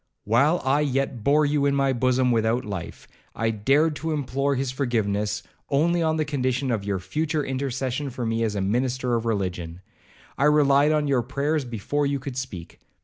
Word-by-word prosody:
While 140 - +2
I 135 +2 +3
yet 135 -4 -1
bore 150 +4 +4
you 145 -1 +2
in 140 - +1
my 135 -1 +2
bosom 130 0 +2
without 115 +2 +1
life, 95 -5 -7 0.3
I 115 0 0
dared 140 +9 +2
to 160 0 -2
implore 140 -1 -1
his 135 -1 -1
foregiveness 105 -6 -1 0.3
only 170 +5 +2
on 160 -1 +1
the 155 - 0
condition 130 -2 -1
of 110 -4 -1
your 100 -1 -1
future 150 - -2
intercession 135 +1 -2
for 125 -1 -5
me 115 0 -1
as 110 -2 0
a 100 - -1
minister 125 +5 0
of 115 -1 0
religion. 90 -5 -3 0.6
I 140 - +3
relied 145 -1 +4
on 150 -1 +1
your 135 -3 +2
prayers 140 +4 -1
before 125 +5 -1
you 140 0 0
could 135 -1 -7
speak. 105 -10 -7
130 Hz, 185 wpm, -24 LUFS, 115-145 Hz, 0.6 s, bore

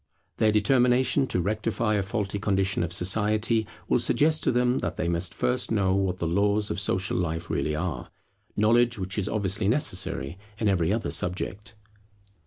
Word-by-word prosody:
Their 110 - +3
determination 125 +5 +3
to 90 - -1
rectify 105 +3 -1
a 105 - +1
faulty 100 +1 -3
condition 95 -2 0
of 85 -1 -2
society 105 +4 +1 0.2
will - - +2
suggest 155 +1 +2
to - - +1
them 125 +1 +1
that - - -4
they - - -1
must 85 +1 0
first 125 +1 -1
know 95 -4 +1
what 95 -2 0
the 85 - -3
laws 100 +4 +1
of - - -2
Social 95 -2 0
life 85 -1 -3
really 75 - -1
are; 80 -6 -4 0.5
knowledge 120 +2 +3
which 95 +2 -3
is 100 +1 -1
obviously 100 -1 -1
necessary 95 - -1 0.2
in 110 - -1
every 90 -4 +1
other 110 +1 -1
subject. 105 +5 -3
100 Hz, 170 wpm, -26 LUFS, 90-110 Hz, 0.5 s, Their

